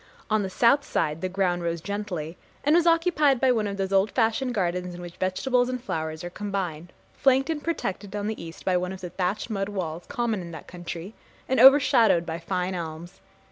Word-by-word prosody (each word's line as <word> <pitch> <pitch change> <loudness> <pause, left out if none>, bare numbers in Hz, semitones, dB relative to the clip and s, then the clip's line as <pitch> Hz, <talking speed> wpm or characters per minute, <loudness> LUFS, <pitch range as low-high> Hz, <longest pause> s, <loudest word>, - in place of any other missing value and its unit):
On 215 0 +3
the 195 - -2
south 245 +8 +4
side 155 - -1
the 185 - -1
ground 180 -2 0
rose 170 0 -2
gently, 185 -3 -4 0.3
and 295 +3 +4
was 345 0 +4
occupied 330 -5 +3
by 260 0 +4
one 220 -4 +1
of 200 -1 -4
those 195 0 -2
old 195 +2 +4
fashioned 230 +3 +1
gardens 180 -2 -1
in 175 - -9
which 175 -1 -9
vegetables 245 +7 +1
and 255 0 -2
flowers 160 -9 -4
are 175 - -5
combined, 180 -5 -4 0.2
flanked 270 +3 +3
and 295 -2 -4
protected 205 - -3
on 205 0 -2
the 215 -3 -4
east 165 -1 -10
by 185 - +2
one 180 +1 -2
of 190 - -9
the 180 -2 -6
thatched 195 +5 -2
mud 195 -1 -2
walls 175 -4 -4
common 230 -4 -1
in 170 - -8
that 160 -2 -9
country, 175 +2 -7 0.3
and 260 - +1
overshadowed 260 -9 +6
by 165 0 -4
fine 180 +2 -2
elms. 170 +1 -7
195 Hz, 210 wpm, -26 LUFS, 175-240 Hz, 0.3 s, overshadowed